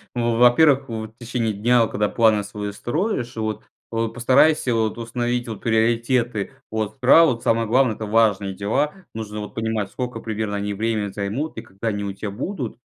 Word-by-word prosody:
В 120 -1 0
во-первых, 135 +3 +5
в 110 -1 -5
течение 115 -2 -2
дня, 115 +3 +3
когда 105 0 -1
планы 110 -3 +3
свои 105 0 -5
строишь, 125 - -2
вот 110 -1 -3 0.3
вот 115 -1 -2
постарайся, 130 +2 +3
вот, 110 -1 0
установить, 120 +1 -2
вот, 110 -3 -6
приоритеты. 115 -1 +1 0.2
От 110 +4 -3
права, 130 0 +5
самое 115 -1 +1
главное- 125 -1 +3
это 110 - -5
важные 105 -3 +2
дела, 110 +10 0 0.2
нужно, 105 -1 -5
вот, 105 - -7
понимать, 110 -3 -2
скока 125 -2 -4
примерно 110 -2 -3
они 100 0 -2
время 110 0 -1
займут 105 +11 -3
и 110 - -4
когда 110 0 -7
они 100 -1 -3
у 100 - -3
тя 100 +2 -5
будут, 125 - -4
115 Hz, 170 wpm, -22 LUFS, 105-120 Hz, 0.3 s, во-первых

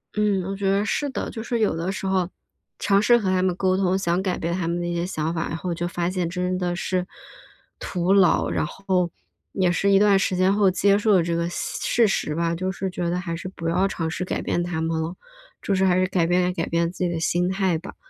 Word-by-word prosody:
嗯， 210 -3 +1
我 195 +2 -4
觉 195 0 -1
得 200 +1 +2
是 285 +6 -1
的。 - - -4
就 225 - -6
是 235 0 -2
有 215 - +2
的 165 +3 -2
时 195 - -5
候， 190 -2 +1 0.5
尝 200 0 +3
试 240 +3 +5
和 205 -5 -1
他 185 0 +2
们 185 -1 +1
沟 185 0 +1
通， 190 -1 +2
想 180 -1 0
改 185 -2 -1
变 170 +1 -2
他 175 -2 -2
们 170 +1 -1
的 175 - -2
一 175 - -2
些 170 0 -1
想 160 -2 -2
法， 165 0 -2
然 165 - -4
后 175 +1 -3
就 175 +1 -3
发 175 0 -2
现 180 -2 -2
真 180 +1 -1
的 175 -1 -1
是 185 0 -2 0.7
徒 180 0 -1
劳。 195 -3 +4
然 - - 0
后 185 +1 -1 0.4
也 185 -2 +2
是 195 +3 +1
一 195 - +6
段 200 -1 +5
时 190 - 0
间 185 +2 +3
后 200 -2 +4
接 200 +2 +3
受 210 0 +2
了 180 -3 +4
这 170 0 -2
个 170 0 0
现 - - -4
事 235 -2 +3
实 150 -5 -1
吧， 170 0 0
就 185 +3 -2
是 190 +1 -3
觉 175 -1 -3
得 175 - -1
还 170 -2 -4
是 185 - -6
不 165 -3 -4
要 185 +3 +2
尝 165 -4 -3
试 180 +3 -3
改 - - -2
变 175 - -1
他 175 -2 -2
们 160 0 -1
了， 165 +3 -4 0.5
就 200 - -1
是 190 0 +2
还 180 -1 +3
是 185 - +3
改 180 -3 +1
变 180 +1 +2
改 165 - -2
变 170 0 0
自 180 - -3
己 175 - 0
的 170 - -2
心 175 +2 +1
态 190 -3 +1
吧。 175 +5 -9
180 Hz, 285 characters per minute, -23 LUFS, 170-195 Hz, 0.7 s, 一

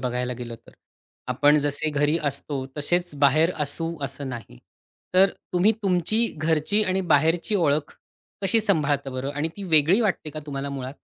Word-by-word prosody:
बघायला 125 0 -2
गेलं 120 -1 -6
तर. - - -16 0.6
आपण 145 +1 +4
जसे 145 +2 -1
घरी 150 +2 +1
असतो, 140 -1 -2
तसेच 175 +2 -1
बाहेर 145 +4 +4
असू 165 +3 -1
असं 140 +1 -5
नाही. 115 - -8 0.6
तर 190 +1 +6 0.2
तुम्ही 180 +5 +4
तुमची 195 +4 +2
घरची 160 +7 +1
आणि 190 -1 0
बाहेरची 165 +7 +3
ओळख 150 -5 +1 0.5
कशी 225 +4 +2
सांभाळता 145 -9 0
बरं 130 +2 -4
आणि 145 +2 -1
ती 200 - -7
वेगळी 165 +3 +4
वाटते 195 -8 -1
का 155 +1 -7
तुम्हाला 140 -1 -4
मुळात? 135 0 -6
150 Hz, 155 wpm, -24 LUFS, 140-175 Hz, 0.6 s, तर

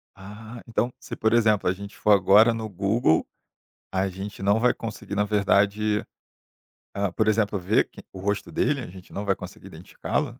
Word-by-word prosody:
Ah, 110 +4 -10
então, 120 +2 -1
se, - - -7
por 110 0 +1
exemplo, 110 -5 +3
a 90 - +3
gente 100 +2 -10
for 105 - +2
agora 105 +4 +6
no 110 -1 -5
Google, 100 -3 +1 0.7
a 95 +1 +1
gente 95 +1 -7
não 100 +2 +3
vai 125 +2 +3
conseguir 110 -2 -7
na 105 - +2
verdade, 105 +1 +2 0.9
ah, 100 -2 -1
por 110 +2 +2
exemplo 105 -2 +1
ver 95 +4 +1
que - - -13
o 95 - -10
rosto 100 +2 -2
dele? 140 -2 0
A - - -7
gente 90 0 -13
não 100 - -4
vai 100 - +2
conseguir - - -10
identificá-lo? - - -4
105 Hz, 185 wpm, -25 LUFS, 100-110 Hz, 0.9 s, agora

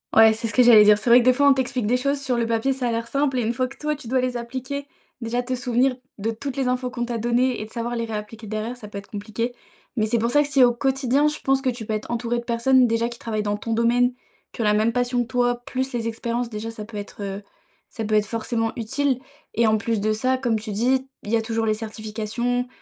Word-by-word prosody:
Ouais, 220 0 +8
c'est 225 +1 -3
ce 225 - -3
que 250 - +5
j'allais 230 -3 +8
dire. 210 0 +6
C'est 215 - -2
vrai 245 - +9
que 240 - 0
des 255 - +6
fois, 285 +3 +3
on - - +7
t'explique 255 -3 -1
des 245 +4 +2
choses 280 +2 0
sur 260 -3 -1
le 235 -1 0
papier, 230 +4 +1
ça 255 -2 -2
a - - 0
l'air 230 0 -2
simple 275 0 0
et 240 - +1
une 230 - 0
fois 255 +1 0
que 270 - -13
toi, 300 0 -1
tu 285 -5 -11
dois 260 +3 +1
les 250 -1 -1
appliquer, 260 +4 -5 0.3
déjà 240 +2 -1
te 255 - -3
souvenir 250 +1 +1 0.2
de 220 +3 -1
toutes 265 +4 -6
les 265 -2 0
infos 250 0 0
qu'on 240 -1 -3
t'a 235 -1 -3
données 240 +1 +1
et - - -4
de - - -14
savoir 240 0 -3
les 230 -1 -2
réappliquer 220 0 -6
derrière, 215 +3 -3
ça 220 -4 -10
peut 205 - -8
être 200 - -9
compliqué. 220 +4 -3 0.4
Mais 215 -1 +2
c'est 235 +2 +2
pour 230 +2 0
ça 290 - +5
que 290 - -1
si, 275 -2 +5
au 240 -1 +5
quotidien, 270 +3 +1
je 300 0 -1
pense 270 0 +2
que 265 - +1
tu 235 -3 -5
peux 215 - -3
être 215 - -4
entouré 235 0 -1
de 235 - -7
personnes 245 +2 +3
déjà 230 +1 +1
qui 235 0 -8
travaillent 215 -2 -2
dans 205 0 -1
ton 225 +2 -3
domaine, 240 +2 +3 0.4
qui - - -6
ont - - +1
la 210 -1 +3
même 220 +2 +2
passion 245 0 +1
que 240 - -3
toi, 245 -1 0
plus 260 0 -3
les 230 -1 -2
expériences 235 +1 -2
déjà, 220 +1 -5
ça 215 -2 -8
peut 220 -1 -9
être, 205 0 -8
heu, 200 0 -5 0.5
ça 225 - -5
peut 215 0 0
être 210 -1 +3
forcément 225 +1 -2
utile 260 +3 0 0.4
e 235 - +3
t 225 - +5
en 220 - +3
plus 225 0 -1
de 215 +2 +1
ça, 255 +4 +1
comme 235 -4 0
tu 215 0 -5
dis, 255 +5 +1
il 205 - -9
y - - +4
a - - 0
toujours 225 0 -1
les 215 - +2
certifications, 225 +3 -3
235 Hz, 285 wpm, -23 LUFS, 220-255 Hz, 0.5 s, vrai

